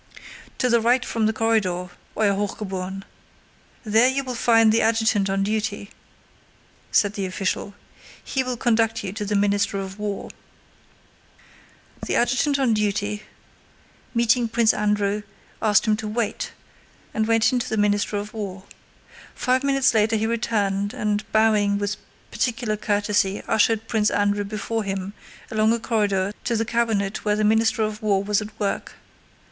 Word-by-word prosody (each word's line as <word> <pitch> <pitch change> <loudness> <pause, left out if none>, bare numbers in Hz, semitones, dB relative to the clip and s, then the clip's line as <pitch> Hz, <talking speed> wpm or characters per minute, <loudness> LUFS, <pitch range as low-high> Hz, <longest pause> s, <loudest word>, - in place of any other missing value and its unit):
"To 255 - +1
the 235 -1 +3
right 245 +2 +2
from 225 -2 0
the - - +2
corridor, 210 -6 0 0.3
Euer 210 -2 +3
Hochgeboren! 195 -2 -4 0.8
There 220 +2 +4
you 275 +1 -1
will 255 -1 -4
find 225 -2 +4
the 225 - +3
adjutant 220 -3 +2
on 195 0 0
duty," 210 0 -2 1.0
said 205 -1 +3
the 195 -2 -3
official. 195 +2 -3 0.5
"He 265 - -1
will 255 -1 -3
conduct 225 -2 +1
you 190 -1 -4
to 210 0 -4
the 205 0 -1
Minister 200 0 +1
of 195 +1 -7
War." 205 -1 -4 1.7
The - - -1
adjutant 255 +4 +2
on 260 -4 +2
duty, 210 0 -1 0.9
meeting 235 +1 +3
Prince 225 0 +3
Andrew, 210 0 0 0.4
asked 215 0 +3
him 215 -1 +3
to 215 - -5
wait, 215 0 -2 0.6
and 220 0 0
went 225 +1 +3
in 250 - +2
to 240 - -4
the 220 - -1
Minister 205 0 +1
of 205 +1 -5
War. 195 -4 -6 0.7
Five 255 +2 +1
minutes 275 -2 +3
later 220 0 +3
he 220 0 0
returned 205 -3 -1
and 210 0 -2
bowing 210 -2 +3
with 205 0 -2 0.3
particular 230 -3 -1
courtesy 205 -1 0
ushered 225 +1 +2
Prince 220 -3 +2
Andrew 205 0 +1
before 215 +2 -3
him 195 0 -4 0.4
along 220 0 +3
a 235 - +1
corridor 205 -4 0
to 235 - 0
the 225 +1 0
cabinet 220 -4 -1
where 210 -1 +1
the 215 - 0
Minister 220 +1 +3
of 215 +1 -3
War 200 -2 +1
was 210 +1 +1
at 215 +1 -9
work. 200 -2 -2
215 Hz, 155 wpm, -23 LUFS, 205-225 Hz, 1.7 s, There